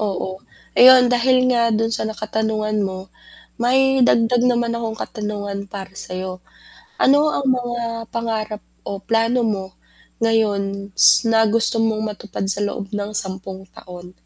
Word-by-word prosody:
Oo, 190 -2 -4 0.3
ayon 250 0 +7
dahil 255 +1 +3
nga 235 -1 +2
dun 225 0 0
sa 220 - -2
na 220 - -7
katanungan, 215 0 -2
mo 190 -1 -5 0.5
may 265 +2 +2
dagdag 240 0 +3
naman 235 -1 0
akong 230 -1 -4
katanungan 205 -2 -5
para 195 -1 -8
sayo, 185 -1 -6 0.6
ano 290 +3 +4
ang 275 - -2
mga 245 -2 -1 0.3
pangarap 220 -2 -4 0.2
o 200 -1 -6
plano 230 +4 0
mo 205 -4 -1 0.6
ngayon 200 -3 -1
s 230 - +6
na 225 -1 +3
gusto 225 +1 +2
mong 220 -1 -1
matupad 205 -2 -7
sa 195 +1 0
loob 205 -1 -4
ng 205 0 -4
10 190 -1 -3
taon? 180 -1 -12
220 Hz, 145 wpm, -20 LUFS, 200-235 Hz, 0.6 s, ayon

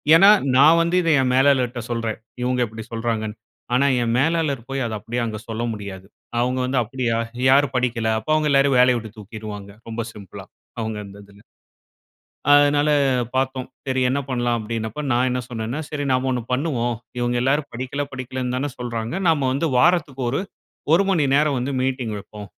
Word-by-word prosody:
ஏன்னா, 195 +4 +7 0.3
நான் 155 +5 +7
வந்து 170 +2 +1
இத 165 - 0
என் 125 -1 +1
மேலாளர்ட்ட 130 -2 +3
சொல்றேன். 115 -2 -2 0.2
"இவ்ங்க 125 0 0
இப்பிடி 110 0 -8
சொல்றாங்கன்னு". 115 -2 -2 0.4
ஆனா, 140 +3 +3 0.2
என் 115 - 0
மேலாளர் 155 -3 +1
போயி 135 0 -2
அத 110 -2 -3
அப்டீயே 120 +3 -3
அங்க 110 -2 -4
சொல்ல 115 0 -3
முடியாது. 95 -2 -8 0.3
அவங்க 125 +1 0
வந்து 130 0 +1
"அப்டீயா? 120 0 -1 0.3
யாரு 140 +1 +5
படிக்கல? 115 -3 0
அப்போ 130 +8 -4
அவங்கள 155 -1 +1
எல்லாரயும் 135 -2 +4
வேலய 125 -1 +5
விட்டுத் 110 0 -11
தூக்கிடுவாங்க 105 -1 -8 0.2
ரொம்ப 115 0 -3
சிம்பிளா, 100 -3 -10 0.4
அவுங்க 110 -1 -3
அந்ததுல. 100 0 -15 1.1
அதனால 145 +1 +5 0.5
பாத்தோம். 130 -1 -1 0.2
சரி 130 0 0
என்ன 140 - 0
பண்ணலாம்? 120 -2 0
அப்டீன்னப்போ, 110 +4 -4
நான் 125 +2 +2
என்ன 125 0 -1
சொன்னேன்னா, 115 +4 -4
"சரி 145 -1 -3
நாம 130 +1 +1
ஒண்ணு 125 - -1
பண்ணுவோம். 125 -4 0 0.2
இவங்க 120 0 0
எல்லாரும் 140 +3 +1
படிக்கல, 130 +4 -3
படிக்கலன்னு 130 -1 -4
தான 145 +2 -1
சொல்றாங்க. 115 -1 -4 0.2
நம்ம 155 -3 +2
வந்து 150 +5 0
வாரத்துக்கு 150 -4 +2
ஒரு 140 - 0 0.5
1 185 - +5
மணி 175 -6 +2
நேரம் 145 -1 +3
வந்து 130 +3 -2
மீட்டிங்வெப்போம் 110 -5 -3
125 Hz, 165 wpm, -22 LUFS, 115-140 Hz, 1.1 s, ஏன்னா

